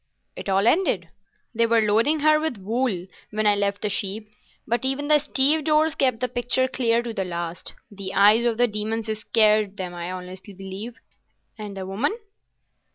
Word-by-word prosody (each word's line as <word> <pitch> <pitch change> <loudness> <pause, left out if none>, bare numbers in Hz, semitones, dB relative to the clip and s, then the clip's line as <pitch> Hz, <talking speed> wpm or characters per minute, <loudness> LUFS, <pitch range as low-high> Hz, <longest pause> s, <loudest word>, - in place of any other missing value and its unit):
"It - - -6
all 195 +1 +2
ended. 240 - +2 0.4
They 230 0 +2
were 230 0 +3
loading 230 +9 +2
her 305 0 +4
with 310 -7 -2
wool 210 -2 -2 0.2
when 215 0 -2
I 210 - +5
left 200 0 -1
the 210 - +1
ship, 200 +1 -2 0.4
but 235 +1 -1
even 270 +2 -1
the 300 -1 +6
stevedores 305 +2 +2
kept 255 -6 0
the 250 - +1
picture 245 +2 0
clear 235 -2 0
to 235 -1 -5
the 195 - -2
last. 170 -1 -5 0.2
The 195 -2 -6
eyes 210 +4 +6
of 235 -2 +1
the 245 0 +4
demons 220 +1 -3
scared 215 -2 +2
them, 180 -2 -5
I 175 +1 -5
honestly 185 +1 -9
believe." 195 +5 -8 0.6
"And 210 -3 -8
the 190 - -5
woman?" 230 - -1
220 Hz, 175 wpm, -24 LUFS, 195-250 Hz, 0.6 s, the